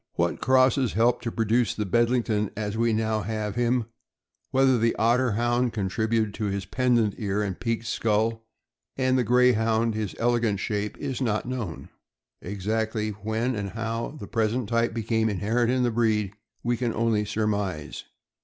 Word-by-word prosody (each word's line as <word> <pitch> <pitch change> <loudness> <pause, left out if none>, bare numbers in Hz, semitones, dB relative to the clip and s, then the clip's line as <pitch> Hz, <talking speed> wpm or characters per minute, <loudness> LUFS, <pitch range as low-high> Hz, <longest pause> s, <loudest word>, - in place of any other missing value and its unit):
What - - 0
crosses 130 -1 +3
helped 120 +3 +2
to 115 - -1
produce 115 0 +1
the 105 - -2
Bedlington 115 -1 +1
as 105 -1 -3
we 115 +1 +2
now 110 0 0
have 105 0 -3
him, 120 +1 +1 0.6
whether 130 -2 +3
the 115 +1 +2
Otter 120 +1 +2
Hound 120 +2 +1
contributed 110 +1 0 0.2
his 100 0 -3
pendent 120 -5 +2
ears 105 0 -1
and 95 -3 -4
peaked 115 -1 -2
skull, 115 +1 0 0.5
and 130 -1 +2
the 130 - +3
Greyhound 115 -1 +3
his 105 -6 -3
ele 120 0 +2
gant 105 -4 0
shape, 105 +1 -2
is 135 -2 -4
not 110 -4 0
known. 110 - -5 0.5
Exactly 110 +3 -2
when 110 +5 -2
and 100 -2 -3
how 115 +6 -4
the 100 - -6
pres 110 0 0
ent 125 -5 -3
type 115 -1 +1
became 110 0 0
inherent 110 +5 0
in 130 0 +2
the 120 - +2
breed 110 -3 +1 0.3
we 120 0 0
can 120 -2 -1
only 115 -2 +1
surmise. 105 -6 -2
115 Hz, 165 wpm, -26 LUFS, 105-120 Hz, 0.6 s, crosses